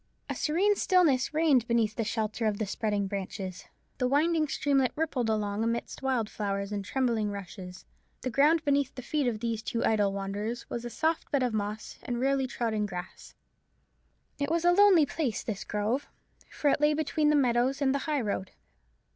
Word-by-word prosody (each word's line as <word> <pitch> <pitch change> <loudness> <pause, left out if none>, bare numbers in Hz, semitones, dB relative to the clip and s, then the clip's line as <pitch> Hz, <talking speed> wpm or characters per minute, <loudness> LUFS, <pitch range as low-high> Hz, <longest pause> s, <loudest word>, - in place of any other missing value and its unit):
A - - -3
serene 380 +7 +2
stillness 340 -11 +3
reigned 300 -7 +3
beneath 225 -2 +1
the 230 - -1
shelter 220 0 -1
of 210 -1 0
the 215 - -1
spreading 205 0 -1
branches. 190 -1 -5 0.3
The 250 - +2
winding 310 +3 +2
streamlet 275 -2 +1
rippled 290 -7 -1
along 210 -1 0
amidst 230 +1 -2
wild 260 -5 0
flowers 200 -1 -3
and 205 -1 -3
trembling 230 -2 0
rushes; 185 -2 -8 0.4
the 255 - -3
ground 300 +6 +3
beneath 280 -2 +1
the 255 - -7
feet 290 +1 0
of 220 -3 -2
these 230 -2 -2
two 230 +1 -2
idle 205 -3 +2
wanderers 200 +4 -4
was 235 - -3
a - - -3
soft 320 +8 -1
bed 280 -3 +1
of 245 -2 0
moss 210 +1 -4
and 240 -1 -3
rarely 270 0 +1
trodden 220 -4 -1
grass. 180 -1 -8 1.0
It 285 0 -1
was 335 +1 0
a 350 - +6
lonely 375 -4 +6
place 265 -8 -2
this 215 -3 -4
grove; 215 +7 -1 0.4
for 290 - 0
it - - 0
lay 300 0 +4
between 310 0 +1
the 300 - +4
meadows 255 0 +2
and 270 -2 +2
the 280 - 0
high 295 -3 +1
road. 200 -3 -2
240 Hz, 185 wpm, -29 LUFS, 210-285 Hz, 1.0 s, a